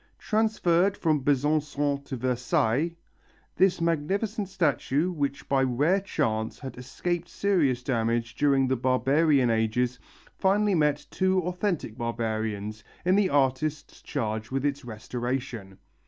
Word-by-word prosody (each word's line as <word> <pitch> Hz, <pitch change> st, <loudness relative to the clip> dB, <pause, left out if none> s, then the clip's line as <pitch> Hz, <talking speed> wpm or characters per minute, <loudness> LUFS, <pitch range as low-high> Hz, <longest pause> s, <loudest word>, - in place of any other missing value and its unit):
Transferred 200 Hz, -4 st, +1 dB
from 155 Hz, -5 st, +1 dB
Besançon 145 Hz, 0 st, +1 dB
to 135 Hz, -, -5 dB
Versailles, 125 Hz, +4 st, 0 dB, 0.6 s
this 185 Hz, -1 st, +3 dB
magnificent 190 Hz, +6 st, -1 dB
statue 175 Hz, -3 st, +1 dB
which 140 Hz, -4 st, -3 dB
by 135 Hz, -1 st, +2 dB
rare 140 Hz, +9 st, +2 dB
chance 110 Hz, -, -1 dB
had 135 Hz, -2 st, -8 dB
escaped 170 Hz, +7 st, -3 dB
serious 150 Hz, -12 st, +1 dB
damage 115 Hz, -2 st, 0 dB
during 135 Hz, 0 st, +2 dB
the 130 Hz, -, +1 dB
barbarian 130 Hz, +1 st, +3 dB
ages 115 Hz, +3 st, 0 dB, 0.4 s
finally 205 Hz, +2 st, +3 dB
met 150 Hz, -4 st, +1 dB
two 185 Hz, 0 st, +2 dB
authentic 180 Hz, -, -2 dB
barbarians 110 Hz, -3 st, -3 dB, 0.2 s
in 185 Hz, +1 st, +4 dB
the 200 Hz, -2 st, +3 dB
artists 145 Hz, +2 st, 0 dB
charged 110 Hz, -4 st, -3 dB
with 135 Hz, +1 st, -2 dB
its 145 Hz, 0 st, -1 dB
restoration. 120 Hz, -3 st, -5 dB
140 Hz, 120 wpm, -27 LUFS, 120-170 Hz, 0.6 s, in